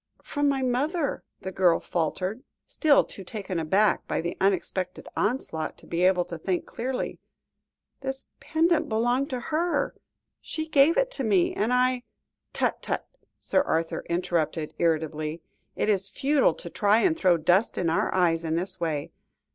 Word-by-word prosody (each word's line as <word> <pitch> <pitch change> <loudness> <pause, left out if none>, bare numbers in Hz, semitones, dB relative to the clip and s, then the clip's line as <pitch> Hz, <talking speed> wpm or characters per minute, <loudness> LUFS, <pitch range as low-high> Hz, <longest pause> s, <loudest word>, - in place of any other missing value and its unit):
"From 290 -1 0
my 270 -1 0
mother," 285 +5 0 0.2
the 190 - -5
girl 180 -2 +3
faltered, 185 +7 -2 0.2
still 300 -3 +4
too 195 - -9
taken 190 -3 -4
aback 190 +6 +2
by - - -1
the 170 +1 -3
unexpected 185 -1 -1
onslaught, 205 -8 -2
to - - -17
be 170 +1 -2
able 180 -1 +4
to 170 - -7
think 180 +1 -1
clearly. 255 +2 -4 0.8
"This 265 0 -6
pendant 330 +1 +1
belonged 240 +5 +1
to 255 - -2
her; 325 +7 0 0.5
she 315 0 -4
gave 305 +1 +4
it - - +2
to 275 - -4
me, 200 -6 +3
and 215 +4 0
I 250 0 +2 0.3
" - - -58
"Tut, - - -1
tut!" - - -3 0.3
Sir 285 - +1
Arthur 165 - -1
interrupted 170 -3 -1
irritably; 160 -1 -1 0.3
"it - - 0
is 195 -2 +1
futile 275 - +2
to 170 - -8
try 210 +2 +3
and 335 -4 +3
throw 185 - +3
dust 180 +7 +2
in 175 - 0
our 165 - +1
eyes 170 -3 +2
in 160 0 -1
this 185 +3 -1
way. 155 -4 -2
195 Hz, 165 wpm, -26 LUFS, 170-265 Hz, 0.8 s, still